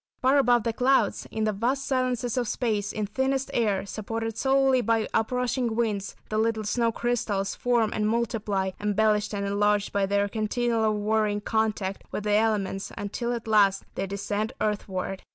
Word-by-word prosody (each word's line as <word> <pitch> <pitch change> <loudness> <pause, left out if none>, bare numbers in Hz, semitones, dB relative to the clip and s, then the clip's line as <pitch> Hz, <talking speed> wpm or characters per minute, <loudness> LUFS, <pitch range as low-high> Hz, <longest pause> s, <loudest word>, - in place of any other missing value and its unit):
Far 265 +2 +4
above 245 -3 +4
the 230 - -1
clouds, 260 +3 +2
in 220 - -2
the 215 - +2
vast 255 +7 -1
silences 255 -3 0
of 245 -2 0
space, 210 -4 -1
in 215 -1 -2
thinnest 265 +5 -1
air, 205 -5 +1
supported 225 +2 -4
solely 270 0 +3
by 230 -2 +1
up 225 +1 +1
rushing 250 -2 0
winds, 210 -4 -1
the 215 - 0
little 220 -1 +1
snow 230 +2 +1
crystals 215 -5 -1
form 235 -3 +1
and 210 0 0
multiply, 215 -4 -1
embellished 210 0 +1
and 200 -1 -2
enlarged 205 0 +1
by 200 -1 +1
their 200 +1 +1
continual 220 +1 0
warring 210 0 +1
contact 215 -3 -1
with 210 - -3
the 210 0 +1
elements, 205 -3 0
until 235 +4 -3
at 235 -2 -4
last 200 -3 +3
they 195 - -3
descend 205 +2 -2
earthward. 195 -2 -2
220 Hz, 170 wpm, -26 LUFS, 205-240 Hz, -, Far